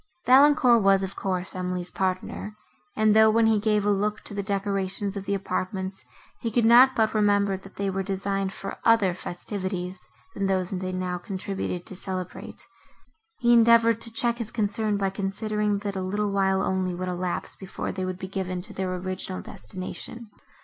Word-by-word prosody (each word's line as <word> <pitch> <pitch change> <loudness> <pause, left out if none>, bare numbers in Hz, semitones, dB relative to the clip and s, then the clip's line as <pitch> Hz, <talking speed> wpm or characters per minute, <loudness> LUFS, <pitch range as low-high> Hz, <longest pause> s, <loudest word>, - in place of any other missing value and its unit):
Valancourt 260 -3 +6
was, 195 -1 +4
of 190 +1 -4
course, 185 -1 -3
Emily's 180 -1 -3
partner, 190 +2 -3 0.4
and 215 -1 +3
though, 220 0 +7
when 225 +1 +3
he 220 -1 +4
gave 210 -1 +1
a 205 - +3
look 210 +1 0
to - - -4
the 200 - -2
decorations 195 0 -1
of 200 -1 -5
the 200 - 0
apartments, 190 0 -3 0.4
he 230 - -2
could 225 +1 +2
not 250 +3 +7
but 220 -2 +2
remember, 205 -2 +2
that 195 +1 -12
they 200 - -2
were 195 0 -1
designed 195 0 -2
for - - -7
other 225 -5 +4
festivities, 185 0 -4 0.3
than 195 -1 -1
those 185 -2 0
they 185 -1 -3
now 180 -1 -3
contributed 190 -1 -4
to 190 - -7
celebrate, 185 -1 -6 0.7
he 240 0 +4
endeavoured 230 -1 +5
to 230 - +2
check 235 +1 0
his 225 -2 -3
concern 215 -1 0
by 195 -1 0
considering, 210 +1 -1
that 200 0 -4
a 190 - -2
little 205 +2 -1
while 190 -1 +2
only 185 -1 -1
would 185 +1 -4
elapse 180 0 -3
before 190 -1 -5
they 190 - -4
would 185 -1 -3
be 190 - -6
given 185 -1 -3
to - - -9
their 185 -1 -2
original 185 0 -5
destination. 210 +4 -7
195 Hz, 180 wpm, -26 LUFS, 185-215 Hz, 0.7 s, though